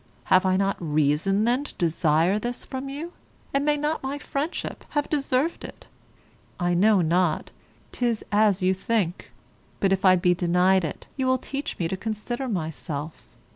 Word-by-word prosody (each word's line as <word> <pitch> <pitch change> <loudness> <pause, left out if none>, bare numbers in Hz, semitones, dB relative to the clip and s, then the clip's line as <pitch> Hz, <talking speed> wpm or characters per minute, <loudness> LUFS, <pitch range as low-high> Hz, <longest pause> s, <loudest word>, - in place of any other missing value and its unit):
Have 185 0 +5
I 185 0 +3
not 195 0 +1
reason 155 +5 +1
then 245 +4 +2
to - - -9
desire 165 +3 +2
this 240 +2 -4
from 265 0 -5
you; 315 +6 -6 0.4
and 275 0 +2
may 295 0 +2
not 300 +2 -1
my 270 +2 -3
friendship 290 +3 -4
have 290 -1 -1
deserved 285 +1 0
it? - - -10 0.7
I 175 -1 +1
know 200 +2 +4
not; 170 0 +1 0.4
'tis 235 -3 -1
as 205 -2 +3
you 185 +1 +4
think; 190 -3 -2 0.5
but 195 -1 +3
if 190 - -1
I 185 -1 +7
be 180 0 +3
denied 180 +2 +3
it, 155 - -5
you 260 -1 0
will 260 0 +3
teach 275 +3 -5
me 170 - -1
to 190 - -2
consider 225 +5 -4
myself. 160 - -5
195 Hz, 170 wpm, -25 LUFS, 175-260 Hz, 0.7 s, I